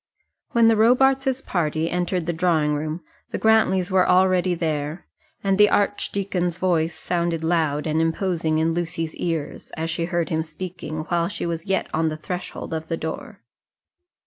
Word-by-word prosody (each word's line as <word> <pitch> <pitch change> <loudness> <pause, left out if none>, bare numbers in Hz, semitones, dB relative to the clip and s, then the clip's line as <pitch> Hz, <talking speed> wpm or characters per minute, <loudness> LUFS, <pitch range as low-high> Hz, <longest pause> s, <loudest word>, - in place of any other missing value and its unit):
When 235 -1 +5
the 225 - +5
Robarts's 265 +4 +3
party 160 -2 -1
entered 180 0 -1
the 170 - -1
drawing 160 -3 +2
room 155 +3 -3 0.3
the - - -3
Grantlys 200 -4 +3
were 185 -1 +3
already 185 -1 +3
there, 155 0 -3 0.4
and 195 0 +1
the 210 0 +7
archdeacon's 195 -3 0
voice 165 -3 +1
sounded 170 -2 -1
loud 160 -3 +1
and 160 0 +1
imposing 165 -1 0
in 160 +1 +1
Lucy's 165 -1 -3
ears, 165 -4 -4
as 165 +1 -2
she 165 +1 -1
heard 175 -1 -1
him 160 0 0
speaking 160 -1 -6
while 170 -1 +1
she 205 - -4
was 165 0 -4
yet 190 0 0
on 160 0 +1
the 155 - -4
threshold 180 +1 -6
of 160 0 -4
the 165 - -2
door. 160 0 -6
170 Hz, 165 wpm, -23 LUFS, 160-185 Hz, 0.4 s, the